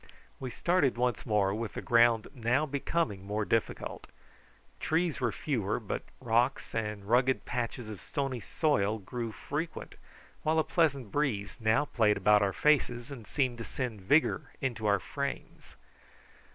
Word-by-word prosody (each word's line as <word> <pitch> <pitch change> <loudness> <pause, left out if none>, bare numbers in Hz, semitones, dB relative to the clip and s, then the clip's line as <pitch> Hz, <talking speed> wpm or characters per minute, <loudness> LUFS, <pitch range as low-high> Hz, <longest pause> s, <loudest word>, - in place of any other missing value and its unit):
We 130 - -4
started 145 -1 +1
once 125 0 0
more, 100 -3 +2
with 110 +1 -4
the - - -3
ground 120 -3 +4
now 125 +3 +1
becoming 140 - -1
more 105 +2 -2
difficult. 115 +1 -2 0.7
Trees 160 -2 0
were 120 -3 +2
fewer, 110 -4 -1
but 110 - -3 0.2
rocks 120 +2 +1
and 105 -3 -3
rugged 125 +4 +2
patches 120 -1 -3
of 105 -3 -7
stony 135 -3 -2
soil 110 - +1
grew 115 +3 -5
frequent, 155 +8 -5 0.4
while 155 +1 +1
a 160 - +4
pleasant 140 - +1
breeze 120 -9 -1
now 110 +6 +3
played 110 -7 +2
about 105 0 +5
our 100 -1 +2
faces 125 -2 +2
and 120 -6 -9
seemed 130 -5 0
to - - -3
send 115 -4 -4
vigour 145 +5 +2
into 120 -6 -2
our 100 -1 +4
frames. 140 +7 -5
120 Hz, 150 wpm, -30 LUFS, 110-140 Hz, 0.7 s, about